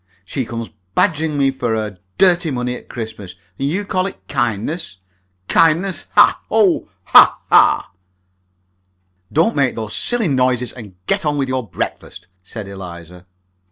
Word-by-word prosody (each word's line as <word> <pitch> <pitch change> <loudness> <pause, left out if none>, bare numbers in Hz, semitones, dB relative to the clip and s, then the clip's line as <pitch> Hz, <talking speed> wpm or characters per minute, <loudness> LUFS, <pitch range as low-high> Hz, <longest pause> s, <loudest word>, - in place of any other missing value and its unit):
She 130 +7 -3
comes 115 0 -6 0.2
badgering 160 -5 +1
me 135 -1 +3
for 120 -4 -2
her 105 -4 -4 0.2
dirty 175 -3 +3
money 125 -2 -2
at - - -12
Christmas, 110 -6 -7 0.2
and 135 +1 0
you 195 +6 -2
call 185 -1 0
it - - -11
'kindness!' 120 - -2 0.5
Kindness! 170 +4 +2
Hah! - - +5
Oh, 210 -5 +2
hah, - - +7
hah!" - - +4 1.4
"Don't 165 +9 +2
make 140 -4 +1
those 110 -2 -4
silly 240 -5 0
noises, 125 -3 +1
and 105 -7 -11
get - - +1
on 150 -1 0
with 135 -2 -1
your 130 -5 -2
breakfast!" 90 +2 -5 0.2
said 100 +2 -8
Eliza. 90 -2 -10
130 Hz, 145 wpm, -18 LUFS, 110-165 Hz, 1.4 s, hah